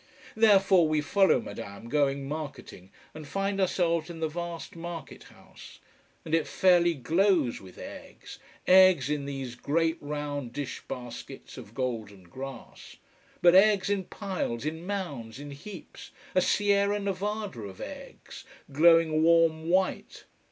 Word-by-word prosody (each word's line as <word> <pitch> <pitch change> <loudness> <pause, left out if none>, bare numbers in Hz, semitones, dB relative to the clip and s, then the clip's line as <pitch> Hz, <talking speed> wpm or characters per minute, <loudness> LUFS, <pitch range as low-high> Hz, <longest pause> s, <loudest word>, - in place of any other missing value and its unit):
Therefore 195 -5 +5
we 155 0 +1
follow 190 +6 +3
Madame 100 +2 -8
going 140 0 0
marketing, 140 - -7 0.2
and 155 -1 -9
find 195 +5 -1
ourselves 170 -3 +1
in 170 -1 -8
the 160 - 0
vast 170 +1 -6
market 165 -3 -8
house, - - -15 0.5
and 160 - -6
it 165 -3 +2
fairly 175 +2 +3
glows 165 - +1
with 95 -2 -14
eggs: - - -10 0.3
eggs 185 -7 +6
in 145 -2 -2
these 135 -3 -5
great 160 +6 0
round 145 -4 -4
dish 140 -1 -5
baskets 125 -2 -8
of 105 - -11
golden 110 -7 -4
grass: 130 +10 -10 0.5
but 175 -1 +7
eggs 200 +1 +5
in 195 -2 -1
piles, 185 - -4
in 160 +3 -4
mounds, 145 - -5
in 145 0 -8
heaps, 170 +7 -10 0.2
a 185 - +4
Sierra 205 +1 +2
Nevada 200 - -3
of 100 -3 -9
eggs, - - -10 0.3
glowing 160 +1 +5
warm 165 -1 +3
white. 185 +1 0
160 Hz, 135 wpm, -28 LUFS, 140-185 Hz, 0.5 s, but